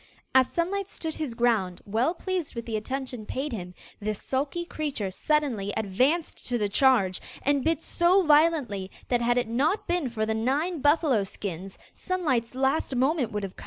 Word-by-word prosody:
As 260 -1 +5
Sunlight 390 +3 -1
stood 320 -1 -4
his 295 -8 -4
ground, 220 -7 +1
well 230 - +1
pleased 365 -6 -3
with 235 0 -5
the 225 - -3
attention 250 +1 -4
paid 280 +1 -3
him, 180 -4 -6 0.2
this 215 0 -3
sulky 280 +6 -2
creature 285 - -3
suddenly 245 -5 0
advanced 255 - 0
to 245 - 0
the 210 -3 0
charge, 205 -6 +3 0.2
and 285 -1 +2
bit 325 0 +1
so 360 +3 +3
violently 295 - +3 0.2
that 245 -1 +2
had 240 +1 +2
it 245 - +1
not 280 - +1
been 345 -6 0
for 220 -2 -1
the 220 - 0
nine 285 +10 0
buffalo 290 -7 +3
skins 190 -1 -6 0.2
Sunlight's 265 -11 -1
last 265 +1 +1
moment 260 -1 +1
would 210 -1 -3
have 195 -1 -5
come. - - -13
260 Hz, 175 wpm, -27 LUFS, 220-310 Hz, 0.2 s, As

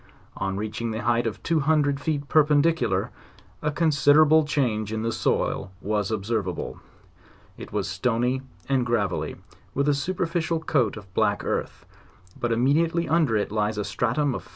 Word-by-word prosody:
On 95 0 -2
reaching 110 +2 -3
the 110 0 -4
height 120 +1 +2
of 110 - -5
two 165 -1 +1
hundred 145 -1 +2
feet 145 -1 -2
perpendicular, 155 +2 +2 0.5
a 150 - 0
considerable 155 0 +4
change 120 -8 0
in 110 0 -2
the 115 - 0
soil 95 - -1
was 105 0 -1
observable; 105 -3 -3 0.8
it - - -10
was 100 -1 -1
stony 120 +6 0 0.3
and 135 -2 +2
gravel 115 -5 0
ly, - - -5 0.4
with 140 +1 +1
a 145 - +4
superficial 165 +2 -1
coat 130 -9 0
of 100 -3 -12
black - - +1
earth, - - -3 0.5
but 120 - -2
immediately 160 +8 +2
under 155 -9 +2
it 105 - -2
lies 105 0 0
a 105 - -1
stratum 130 +6 0
of - - -7
125 Hz, 155 wpm, -25 LUFS, 110-150 Hz, 0.8 s, considerable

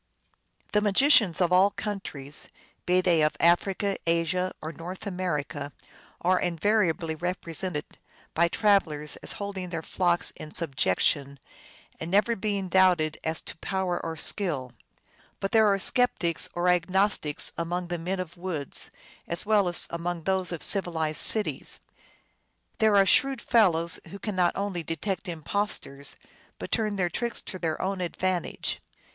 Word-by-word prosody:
The 210 - +3
magicians 210 - +5
of 175 0 +3
all 190 +2 +6
countries, 175 -10 -6 0.4
be 180 +1 +4
they 175 -3 +3
of 150 0 +1
Africa, 190 +4 +2
Asia, 170 +2 +1
or 155 - -5
North 175 +6 -8
America, 150 -7 -3 0.5
are 185 +1 +3
invariably 175 -2 +1
represented 170 -1 -4 0.5
by 170 +1 +3
travelers 170 -7 +1
as - - -2
holding 195 -3 -5
their 165 -2 -4
flock 175 0 0
in 155 - -10
subjection, 140 - +1 0.6
and 160 - -5
never 210 +5 +3
being 200 -2 -2
doubted 180 -4 +3
as 160 0 0
to - - -7
power 185 -1 -2
or 165 -1 -4
skill. 150 -8 -1 0.7
But 195 - -2
there 220 -1 +5
are 195 - +2
skeptics 190 - +1
or 175 +1 0
Agnostics 180 -3 +1
among 175 +1 -3
the 175 -1 -2
men 185 +3 -3
of 175 -2 -5
the - - -21
woods 170 -6 -3 0.4
as 170 - -3
well 205 -3 +3
as 175 - 0
among 170 0 -3
those 190 0 0
of 170 - -5
civilized 160 -6 0
cities. 215 -2 +3 1.0
There 215 -2 +4
are 195 - +6
shrewd 270 +6 +4
fellows 170 -9 +3
who 200 - -8
cannot 185 -4 0
only 195 -3 -2
detect 175 +6 -3
impostors, 160 -4 -2 0.4
but - - -7
turn 215 -3 +1
their 185 -3 +1
tricks 235 +5 -2
to 185 - -6
their 160 -3 -2
own 190 0 -2
advantage. 180 0 -2
180 Hz, 145 wpm, -27 LUFS, 165-195 Hz, 1.0 s, all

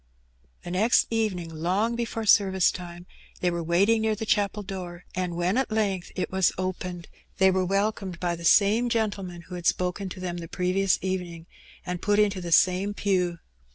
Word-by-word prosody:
The 175 - -6
next 215 +6 +3
evening, 190 -7 -1
long 190 +9 0
before 230 -1 -3
service 190 -3 +4
time, 175 -1 -9 0.3
they 180 - +1
were 170 0 -2
waiting 195 +7 +3
near 220 -1 +1
the 220 - -5
chapel 205 -1 0
door, 180 -3 -7
and 180 -2 -2
when 175 +5 0
at 265 - -1
length 205 -5 -1
it 185 - -3
was 190 -1 +3
opened, 180 -2 -4 0.3
they 190 0 +5
were 185 0 +1
welcomed 195 -1 -1
by 175 -1 -1
the 170 - -10
same 215 +7 +4
gentleman 200 -6 -2
who 180 - -12
had 175 -1 -3
spoken 180 +2 0
to 185 - -8
them 180 -1 -4
the 170 -1 -7
previous 185 +2 +1
evening, 180 -3 -4 0.4
and 180 0 -4
put 205 0 +2
into 205 -3 +2
the 175 - -5
ttune 185 +4 +3
pew. 180 -4 0
185 Hz, 185 wpm, -26 LUFS, 175-205 Hz, 0.4 s, they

